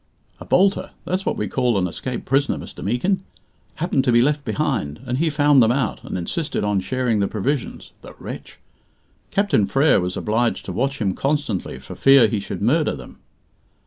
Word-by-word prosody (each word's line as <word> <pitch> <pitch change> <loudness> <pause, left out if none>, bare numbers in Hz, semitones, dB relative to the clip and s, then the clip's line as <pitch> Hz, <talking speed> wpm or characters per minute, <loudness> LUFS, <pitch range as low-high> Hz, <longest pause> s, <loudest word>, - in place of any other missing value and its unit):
"A - - -9
'bolter' 195 +2 +2 0.2
that's 185 +1 -2
what - - 0
we 105 - -2
call 125 -4 +1
an 95 - +1
escaped 125 +8 -5
prisoner, 135 +2 +1
Mr. - - -9
Meekin 125 - 0 0.5
happened 155 -5 0
to 125 - +3
be 120 - +5
left 145 +1 +1
behind, 110 - -2
and 125 +1 -2
he 165 0 +2
found 145 -2 +4
them 115 0 +4
out, 125 -4 -1
and - - -5
insisted 145 - -2
on 105 -1 +1
sharing 125 +1 0
the 100 - +1
provisions 125 +7 -3
the - - -12
wretch! - - -9 0.7
Captain 200 - +2
Frere 135 +4 +3
was 90 0 -3
obliged 115 +2 0
to - - -5
watch 135 +2 -1
him 100 -4 0
constantly 140 -8 -2
for - - -10
fear 135 -4 +6
he 105 0 -1
should 100 - -5
murder 150 +7 +2
them. 65 -3 -12
130 Hz, 185 wpm, -22 LUFS, 105-145 Hz, 0.7 s, fear